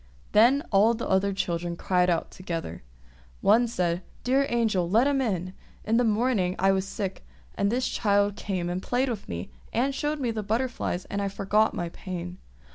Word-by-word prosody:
Then 250 +7 +5
all 215 +3 +5
the 230 - -4
other 190 +1 +2
children 175 -2 -2
cried 180 +1 +1
out 170 -2 0
together. 165 - -5 0.6
One 230 +4 +4
said, 180 -6 -1 0.2
"Dear 270 +2 +2
Angel, 215 -7 +1
let 225 +7 +4
him 280 -1 +2
in! 185 -6 -2 0.3
In 225 +2 +2
the 245 - +4
morning 215 -5 +1
I 195 +1 +3
was 190 0 0
sick, 195 -3 -4 0.3
and 200 +1 0
this 250 +1 0
child 205 -1 +1
came 185 -5 -3
and 175 +1 -2
played 255 +5 0
with 220 -5 -5
me, 85 +1 -5 0.2
and 265 +4 +1
showed 295 +2 -2
me 245 -4 0
the 220 -1 -3
butterflies, 220 -3 -2
and 200 - -3
I 200 - 0
forgot 200 +2 +1
my 175 -1 -3
pain. 180 0 -7
200 Hz, 185 wpm, -27 LUFS, 180-235 Hz, 0.6 s, Then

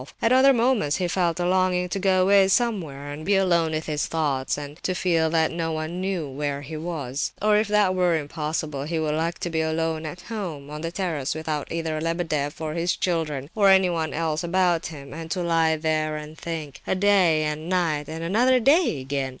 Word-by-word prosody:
At 230 - +2
other 260 +2 +6
moments 235 - +2
he 180 - -1
felt 175 -1 0
a 175 - 0
longing 185 -1 +2
to 195 - -2
go 185 -1 +3
away 195 0 +5
somewhere 175 - -1
and 150 +2 -7
be 200 +4 +2
alone 170 -4 +3
with 155 0 -2
his 150 -1 -1
thoughts, 145 -5 -1
and 145 +2 -8
to 185 - -1
feel 165 -3 +1
that 160 0 +2
no 165 -1 -2
one 160 +3 -4
knew 185 -5 -2
where 140 +1 -3
he 155 +3 -7
was. 155 -5 -3
Or 210 0 +3
if 210 0 +2
that 205 -3 +3
were 180 -2 +2
impossible 150 -1 -3
he 165 +2 -2
would 155 -1 0
like 165 +2 -1
to 175 - -2
be 160 -1 0
alone 160 0 -1
at 175 +3 -8
home, 170 -11 -6
on 150 0 -6
the 165 0 -3
terrace—without 155 -4 -3
either 160 -2 -2
Lebedeff 160 -3 -2
or 155 -1 -3
his 170 +2 0
children, 155 -5 -2
or 200 -2 +4
anyone 180 -4 +3
else 160 +1 -1
about 175 -1 +1
him, 140 -4 -9
and 165 +1 -7
to 180 +3 -2
lie 165 -2 +2
there 155 -1 -1
and 150 +1 -8
think—a 160 -1 -4
day 185 -5 +3
and 155 +2 -3
night 165 -6 0
and 160 +1 -5
another 245 +9 +3
day 275 - +3
again! 135 0 -2
165 Hz, 205 wpm, -24 LUFS, 155-185 Hz, -, other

